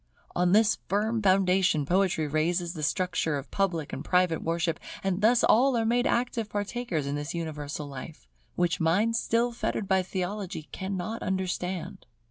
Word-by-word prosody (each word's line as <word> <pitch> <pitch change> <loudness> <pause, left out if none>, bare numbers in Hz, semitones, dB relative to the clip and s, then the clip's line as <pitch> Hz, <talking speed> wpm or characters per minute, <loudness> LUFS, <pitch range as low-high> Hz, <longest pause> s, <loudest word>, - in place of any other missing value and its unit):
On 175 0 +2
this 215 +2 +4
firm 215 +3 +1
foundation 185 -5 +3
Poetry 180 -1 +2
raises 170 +4 0
the 160 - -6
structure 170 -1 0
of 140 - -8
public 175 -7 -1
and 135 - -4
private 180 -1 +2
worship; 165 0 -1 0.2
and 195 0 0
thus 230 +3 +4
all 255 +2 +4
are 225 - +1
made 245 +3 +2
active 235 -3 0
partakers 205 - -2
of 140 - -2
this 145 +2 -4
universal 150 -3 -4
life, 140 - -9 0.3
which 175 0 +1
minds 205 +8 +2
still 235 +1 +1
fettered 220 -3 -2
by 190 -1 +3
theology 185 -3 -4
cannot 190 +3 -4
understand. 185 -4 -3
185 Hz, 155 wpm, -28 LUFS, 165-210 Hz, 0.3 s, this